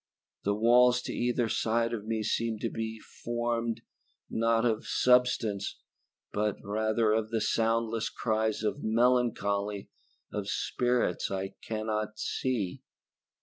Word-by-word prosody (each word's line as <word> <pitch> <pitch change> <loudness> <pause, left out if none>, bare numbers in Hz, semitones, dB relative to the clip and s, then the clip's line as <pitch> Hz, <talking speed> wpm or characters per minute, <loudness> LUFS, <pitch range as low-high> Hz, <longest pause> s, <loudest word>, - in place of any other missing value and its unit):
The 100 +1 +2
walls 125 +3 +5
to - - -4
either 120 -1 +1
side 115 +1 +1
of 110 -2 -4
me 110 -1 -1
seem 115 +1 0
to 115 - -1
be 110 0 -4
formed, 120 0 -3 0.5
not 115 +1 +2
of 110 -2 0
substance, 125 -5 +2 0.6
but 105 -1 0
rather 110 +1 +1
of 110 0 0
the 115 0 0
soundless 115 0 +1
cries 110 -1 -1
of 125 +7 -1
melancholy 110 -4 +1 0.4
of - - -3
spirits 125 -7 0
I 95 0 -3
cannot 110 -1 -3
see. 110 -9 -2
115 Hz, 120 wpm, -30 LUFS, 110-120 Hz, 0.6 s, walls